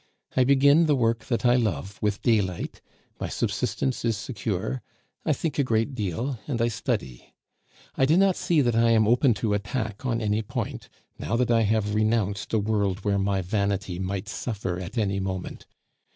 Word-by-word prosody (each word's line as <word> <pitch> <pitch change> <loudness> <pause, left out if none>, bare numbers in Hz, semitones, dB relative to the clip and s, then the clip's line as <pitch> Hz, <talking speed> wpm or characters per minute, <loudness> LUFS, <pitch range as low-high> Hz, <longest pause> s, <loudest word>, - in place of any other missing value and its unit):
I 130 - +4
begin 140 +4 +5
the 150 - +4
work 115 -2 +1
that 120 0 -1
I 120 0 +5
love 100 - -2
with 105 -1 -1
daylight, 100 -7 0 0.4
my - - -2
subsistence 130 -2 -1
is 115 -3 +1
secure, 100 - -3 0.5
I - - +4
think 150 +2 -2
a - - +4
great 115 +2 0
deal, 115 +4 -3
and 130 -5 -2
I 115 +1 +2
study. 65 - -4 0.6
I 135 - +2
do 160 +4 +4
not 195 -1 +4
see 165 -4 +2
that 120 -3 +2
I 115 0 +4
am 110 -2 +4
open 120 +1 +4
to 105 0 -1
attack 105 +1 -3
at 120 -3 0
any 105 -1 0
point, 105 - -5 0.3
now 115 - -2
that 120 0 +1
I 115 -1 +4
have 105 -1 +1
renounced 105 -2 0
a 115 - +2
world 100 -2 0
where 100 -1 +2
my 95 -1 0
vanity 100 -1 -1
might 95 +2 -3
suffer 100 -6 -3
at 95 +6 -7
any 100 -3 +1
moment. 95 -1 -5
110 Hz, 180 wpm, -26 LUFS, 100-120 Hz, 0.6 s, begin